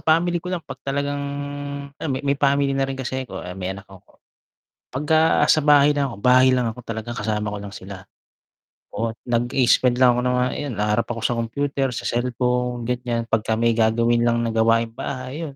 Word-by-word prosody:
family 170 Hz, +2 st, +3 dB
ko 180 Hz, +2 st, -4 dB
lang 180 Hz, -, -2 dB
'pag -, -, -6 dB
talagang 140 Hz, +1 st, -2 dB, 0.7 s
alam 155 Hz, -, -4 dB
mo 130 Hz, -, -2 dB
may 140 Hz, 0 st, 0 dB
family 140 Hz, -1 st, +2 dB
na 135 Hz, -, +2 dB
rin 135 Hz, 0 st, -5 dB
kasi 130 Hz, 0 st, -3 dB
ako, -, -, -7 dB
eh, 90 Hz, +1 st, -8 dB
may 95 Hz, 0 st, -3 dB
anak 100 Hz, 0 st, -12 dB
ako. 95 Hz, -2 st, -18 dB, 0.7 s
Pagka 155 Hz, +4 st, +3 dB
sa 155 Hz, -, +4 dB
bahay 145 Hz, 0 st, +5 dB
lang 140 Hz, -2 st, 0 dB
ako, 110 Hz, -, -9 dB
bahay 130 Hz, +2 st, +5 dB
lang 125 Hz, -2 st, +1 dB
ako 115 Hz, +2 st, -6 dB
talaga, 115 Hz, +1 st, -5 dB
kasama 105 Hz, -1 st, -2 dB
ko 105 Hz, 0 st, -3 dB
lang 100 Hz, -, -7 dB
sila. 95 Hz, 0 st, -9 dB, 0.9 s
Oh, 115 Hz, +2 st, -1 dB, 0.2 s
nag-i-spend 120 Hz, +1 st, +2 dB
lang 125 Hz, -1 st, +5 dB
ako 120 Hz, -, 0 dB
ng 125 Hz, 0 st, 0 dB
mga 125 Hz, 0 st, +1 dB
ayun, 145 Hz, -3 st, -4 dB
haharap 105 Hz, +2 st, +1 dB
ako 115 Hz, -1 st, -4 dB
sa 120 Hz, -, +2 dB
computer, 135 Hz, +4 st, -1 dB
sa -, -, -5 dB
cellphone 125 Hz, 0 st, -1 dB
ganiyan, 120 Hz, -1 st, -2 dB
pagka 110 Hz, -1 st, 0 dB
may 115 Hz, 0 st, +2 dB
gagawin 115 Hz, +1 st, +2 dB
lang 120 Hz, 0 st, +2 dB
na 115 Hz, -, -1 dB
gawaing 115 Hz, 0 st, +2 dB
bahay 130 Hz, +6 st, -5 dB
yun, 140 Hz, -, -10 dB
125 Hz, 200 wpm, -22 LUFS, 115-140 Hz, 0.9 s, bahay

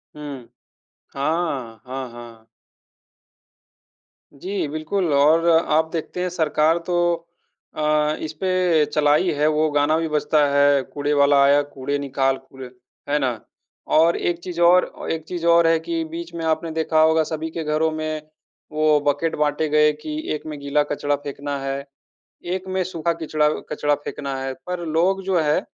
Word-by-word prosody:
हुँ। 140 Hz, -5 st, -8 dB, 0.7 s
हाँ, 135 Hz, -7 st, -2 dB
हाँ, 130 Hz, 0 st, -5 dB
हाँ। 115 Hz, -2 st, -12 dB, 1.9 s
जी, 185 Hz, +4 st, -3 dB
बिल्कुल, 155 Hz, +3 st, -1 dB
और 155 Hz, +4 st, +4 dB
आप 160 Hz, -1 st, +3 dB
देखते 165 Hz, +2 st, -4 dB
हैं, 180 Hz, -, -1 dB
सरकार 160 Hz, -1 st, +2 dB
तो 180 Hz, -, 0 dB, 0.8 s
अ, 150 Hz, 0 st, +1 dB
इस 155 Hz, 0 st, -5 dB
पे 180 Hz, -4 st, +2 dB
चलाई 150 Hz, +4 st, +2 dB
है, 150 Hz, +1 st, 0 dB
वो 155 Hz, 0 st, +2 dB
गाना 145 Hz, +2 st, +2 dB
भी 165 Hz, -, -1 dB
बजता 150 Hz, 0 st, +2 dB
है, 140 Hz, -1 st, +4 dB
कूड़े 145 Hz, 0 st, -1 dB
वाला 140 Hz, 0 st, +5 dB
आया, 140 Hz, +1 st, +5 dB
कूड़े 140 Hz, 0 st, -4 dB
निकाल, 135 Hz, -1 st, 0 dB
कूड़े। 135 Hz, 0 st, -12 dB, 0.4 s
है 150 Hz, -, +2 dB
ना? 130 Hz, -3 st, +1 dB, 0.7 s
और 165 Hz, +2 st, +4 dB
एक 175 Hz, -1 st, -1 dB
चीज़ 175 Hz, -1 st, -7 dB
और 180 Hz, +1 st, +6 dB
अ, -, -, -10 dB
एक 160 Hz, -1 st, -3 dB
चीज़ 175 Hz, -1 st, -4 dB
और 170 Hz, 0 st, +5 dB
है 165 Hz, -1 st, +3 dB
कि 165 Hz, -1 st, -1 dB
बीच 170 Hz, +1 st, -7 dB
में 165 Hz, -1 st, -5 dB
आपने 160 Hz, +1 st, -1 dB
देखा 160 Hz, 0 st, +1 dB
होगा, 160 Hz, 0 st, +4 dB
सभी 160 Hz, +1 st, -4 dB
के 165 Hz, 0 st, -4 dB
घरों 155 Hz, +1 st, +1 dB
में 155 Hz, 0 st, -3 dB, 0.5 s
वो 155 Hz, -1 st, +3 dB
बकेट 145 Hz, +3 st, +1 dB
बाँटे 150 Hz, +1 st, 0 dB
गए 150 Hz, 0 st, +4 dB
कि, 305 Hz, -, -7 dB, 0.2 s
एक 150 Hz, -, -9 dB
में 155 Hz, -2 st, -6 dB
गीला 140 Hz, +1 st, +1 dB
कचरा 145 Hz, 0 st, 0 dB
फेंकना 145 Hz, 0 st, -4 dB
है, 135 Hz, 0 st, -3 dB, 0.6 s
एक 185 Hz, +2 st, -3 dB
में 185 Hz, 0 st, -1 dB
सूखा 170 Hz, -2 st, -2 dB
कचरा 150 Hz, -1 st, +2 dB, 0.2 s
कचरा 145 Hz, 0 st, +1 dB
फेंकना 140 Hz, -2 st, -5 dB
है। 135 Hz, 0 st, -3 dB
पर 180 Hz, -1 st, -4 dB
लोग 180 Hz, +5 st, +1 dB
जो 190 Hz, -2 st, +1 dB
हैं 150 Hz, -1 st, +2 dB
अ, -, -, -19 dB
155 Hz, 165 wpm, -22 LUFS, 145-165 Hz, 1.9 s, और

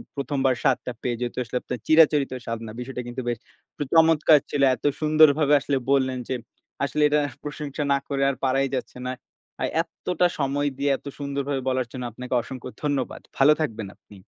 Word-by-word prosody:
১ম 140 Hz, 0 st, -3 dB
বার 130 Hz, -, +4 dB
স্বাদটা 130 Hz, -2 st, +1 dB
পেয়ে। 120 Hz, -1 st, -1 dB
যেহেতু 120 Hz, 0 st, -4 dB
আসলে 120 Hz, +2 st, -3 dB
আপনার 125 Hz, -2 st, -5 dB
চিরাচরিত 155 Hz, -4 st, +5 dB
স্বাদ 115 Hz, -1 st, -3 dB
না। 110 Hz, -, -7 dB
বিষয়টা 125 Hz, 0 st, -5 dB
কিন্তু 125 Hz, +2 st, -5 dB
বেশ 120 Hz, -, -1 dB, 0.4 s
উম 145 Hz, -, -1 dB
চমৎকার 160 Hz, -2 st, +6 dB
ছিল। 145 Hz, -, -1 dB
এত -, -, -14 dB, 0.2 s
সুন্দরভাবে 155 Hz, -1 st, +5 dB
আসলে 140 Hz, 0 st, 0 dB
বললেন 130 Hz, -2 st, +2 dB
যে, 130 Hz, -, 0 dB, 0.5 s
আসলে 150 Hz, +2 st, -1 dB
এটা 150 Hz, +1 st, +3 dB, 0.2 s
প্রশংসা 150 Hz, 0 st, -4 dB
না -, -, +3 dB
করে 140 Hz, -1 st, -2 dB
আর 135 Hz, -, -1 dB
পারাই 135 Hz, +1 st, +2 dB
যাচ্ছে 125 Hz, -, -7 dB
না। 130 Hz, -, -2 dB, 0.5 s
আর -, -, +1 dB
এত্তটা 180 Hz, +1 st, -1 dB
সময় 145 Hz, +1 st, 0 dB
দিয়ে 140 Hz, +1 st, 0 dB
এত -, -, -30 dB
সুন্দরভাবে 140 Hz, -1 st, -2 dB
বলার 130 Hz, -2 st, 0 dB
জন্য 125 Hz, -, -6 dB
আপনাকে 125 Hz, +3 st, -6 dB
অসংখ্য 130 Hz, +2 st, -8 dB
ধন্যবাদ। 145 Hz, -4 st, -2 dB, 0.2 s
ভালো 140 Hz, +3 st, +6 dB
থাকবেন 110 Hz, -8 st, -3 dB
আপনি। 100 Hz, -, -17 dB
140 Hz, 185 wpm, -24 LUFS, 130-150 Hz, 0.5 s, চমৎকার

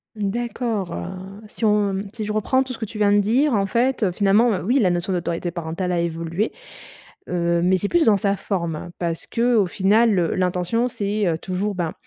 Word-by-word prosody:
D'accord, 220 Hz, -1 st, -2 dB
heu, 85 Hz, 0 st, -4 dB, 0.4 s
si 215 Hz, -, -9 dB
on 205 Hz, -2 st, +1 dB
si 220 Hz, -2 st, -4 dB
je 210 Hz, -, -3 dB
reprends 260 Hz, +5 st, +2 dB
tout 260 Hz, -1 st, -7 dB
ce -, -, -9 dB
que 225 Hz, -, -2 dB
tu 215 Hz, -, -9 dB
viens 205 Hz, -1 st, +3 dB
de 205 Hz, -, +5 dB
dire, 245 Hz, +8 st, +2 dB
en 200 Hz, -2 st, +1 dB
fait, 235 Hz, +1 st, +1 dB
finalement, 205 Hz, +6 st, +3 dB
heu, 180 Hz, -, -4 dB
oui, 245 Hz, +9 st, +2 dB
la 200 Hz, -7 st, +3 dB
notion 175 Hz, +2 st, -1 dB
d'autorité 175 Hz, 0 st, -2 dB
parentale 170 Hz, +2 st, -3 dB
a 175 Hz, -, +1 dB
évolué, 170 Hz, +4 st, -2 dB, 0.8 s
heu, 170 Hz, -1 st, +1 dB
mais 185 Hz, +1 st, +3 dB
c'est 200 Hz, +3 st, -2 dB
plus 345 Hz, -2 st, +3 dB
dans 215 Hz, -3 st, +5 dB
sa 200 Hz, +1 st, +1 dB
forme 175 Hz, -5 st, -3 dB
parce 170 Hz, -2 st, -3 dB
qu'au 230 Hz, -4 st, +2 dB
final, 205 Hz, +4 st, +3 dB
heu, 170 Hz, -2 st, 0 dB
l'intention, 185 Hz, +6 st, 0 dB
c'est, 205 Hz, -3 st, -1 dB
heu, 160 Hz, -2 st, +1 dB
toujours, 195 Hz, +4 st, -3 dB
ben, 170 Hz, -3 st, -2 dB
200 Hz, 205 wpm, -22 LUFS, 175-220 Hz, 0.8 s, de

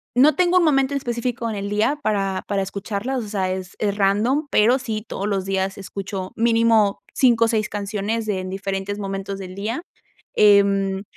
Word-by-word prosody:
no 275 Hz, +4 st, +5 dB
tengo 360 Hz, +1 st, +3 dB
un -, -, +2 dB
momento 275 Hz, -2 st, +2 dB
en -, -, +1 dB
específico 240 Hz, -2 st, -3 dB
en 220 Hz, -, -3 dB
el 200 Hz, 0 st, -4 dB
día 215 Hz, +8 st, +1 dB
para 195 Hz, -3 st, 0 dB
para 200 Hz, -1 st, 0 dB
escucharla, 200 Hz, +6 st, -4 dB
o -, -, -1 dB
sea, 200 Hz, -3 st, -2 dB
es 185 Hz, 0 st, -5 dB
es 205 Hz, -1 st, -1 dB
random, 215 Hz, +9 st, +2 dB
pero 235 Hz, +5 st, +4 dB
sí 220 Hz, -4 st, -4 dB
todos 200 Hz, -, -4 dB
los 195 Hz, -2 st, -1 dB
días 195 Hz, 0 st, -1 dB
escucho 195 Hz, -1 st, -6 dB
mínimo 225 Hz, -3 st, +3 dB
5 235 Hz, -3 st, +4 dB
o -, -, +1 dB
6 215 Hz, -2 st, 0 dB
canciones 210 Hz, +2 st, -3 dB
de 205 Hz, -3 st, -1 dB
en 185 Hz, 0 st, -5 dB
diferentes 195 Hz, +1 st, -3 dB
momentos 195 Hz, 0 st, -4 dB
del 185 Hz, -1 st, -8 dB
día. 220 Hz, -, -3 dB, 0.5 s
Em, 200 Hz, -1 st, +4 dB
205 Hz, 190 wpm, -22 LUFS, 195-230 Hz, 0.5 s, no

